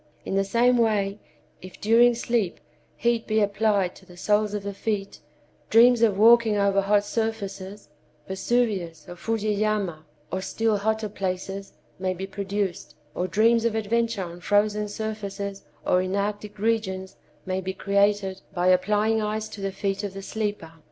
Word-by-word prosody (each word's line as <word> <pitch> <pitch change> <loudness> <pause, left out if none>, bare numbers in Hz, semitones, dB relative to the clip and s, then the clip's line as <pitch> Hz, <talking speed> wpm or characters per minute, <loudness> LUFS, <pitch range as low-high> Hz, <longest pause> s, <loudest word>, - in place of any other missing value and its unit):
In - - -3
the 195 0 +2
same 240 +4 +3
way, 210 -3 +1 0.4
if 185 0 -11
during 235 +3 +5
sleep 230 -5 -1 0.4
heat 235 -1 0
be 215 0 +2
applied 205 -2 +1
to - - -17
the 180 - -14
soles 210 +2 +1
of 205 - -4
the 200 0 -4
feet, 200 -1 -3 0.5
dreams 235 +1 +6
of 215 -4 +3
walking 225 0 +6
over 200 -1 +3
hot 205 +1 +2
surfaces—Vesuvius 195 -2 -3
or 175 - -8
Fusiyama, 210 -4 -1 0.3
or 185 - -2
still 220 +2 0
hotter 220 +1 0
places—may 190 -1 -5
be 190 +2 -4
produced, 195 -1 -3 0.2
or 180 - -2
dreams 225 +4 +3
of 230 -1 +1
adventure 225 -1 0
on 175 0 -8
frozen 210 +2 +2
surfaces 200 -2 -5 0.2
or 180 - +3
in 185 +1 -2
arctic 205 +1 -3
regions 195 -3 -1 0.3
may 185 0 -2
be 190 0 -3
created 200 0 +1
by 180 +1 +2
applying 210 +4 +2
ice 215 +1 -2
to 205 - -9
the 195 0 -2
feet 195 +1 -2
of 195 -2 -5
the 195 - -7
sleeper. 205 -6 -3
205 Hz, 150 wpm, -25 LUFS, 190-220 Hz, 0.5 s, dreams